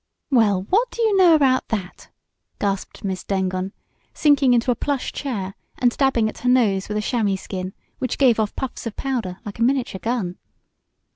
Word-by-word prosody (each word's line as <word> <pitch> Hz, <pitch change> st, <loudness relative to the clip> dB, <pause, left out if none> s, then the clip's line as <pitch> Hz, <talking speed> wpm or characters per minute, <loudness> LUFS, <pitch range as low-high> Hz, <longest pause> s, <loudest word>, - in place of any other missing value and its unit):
"Well, 210 Hz, -7 st, +3 dB
what 470 Hz, +5 st, +3 dB
do -, -, -12 dB
you 435 Hz, -3 st, +3 dB
know 360 Hz, -4 st, +7 dB
about 265 Hz, -4 st, +3 dB
that?" 195 Hz, -5 st, -5 dB, 0.5 s
gasped 200 Hz, -1 st, -3 dB
Miss 190 Hz, -2 st, -3 dB
Dengon, 190 Hz, -1 st, -1 dB, 0.4 s
sinking 285 Hz, -4 st, +4 dB
into 240 Hz, +1 st, +2 dB
a -, -, +1 dB
plush 280 Hz, +2 st, -2 dB
chair, 200 Hz, -9 st, -4 dB, 0.2 s
and 245 Hz, -1 st, +2 dB
dabbing 265 Hz, -5 st, +2 dB
at -, -, -6 dB
her 250 Hz, -, 0 dB
nose 215 Hz, -7 st, +3 dB
with 210 Hz, -, -1 dB
a -, -, 0 dB
chamois 210 Hz, -3 st, 0 dB
skin, 185 Hz, 0 st, -5 dB, 0.3 s
which 255 Hz, -, -2 dB
gave 250 Hz, -5 st, +4 dB
off 215 Hz, -2 st, -1 dB
puffs 260 Hz, -2 st, -5 dB
of 220 Hz, -, -6 dB
powder 235 Hz, -10 st, -3 dB
like 205 Hz, +1 st, -7 dB
a -, -, +2 dB
miniature 250 Hz, -6 st, 0 dB
gun. 220 Hz, -6 st, -2 dB
230 Hz, 185 wpm, -22 LUFS, 195-265 Hz, 0.5 s, know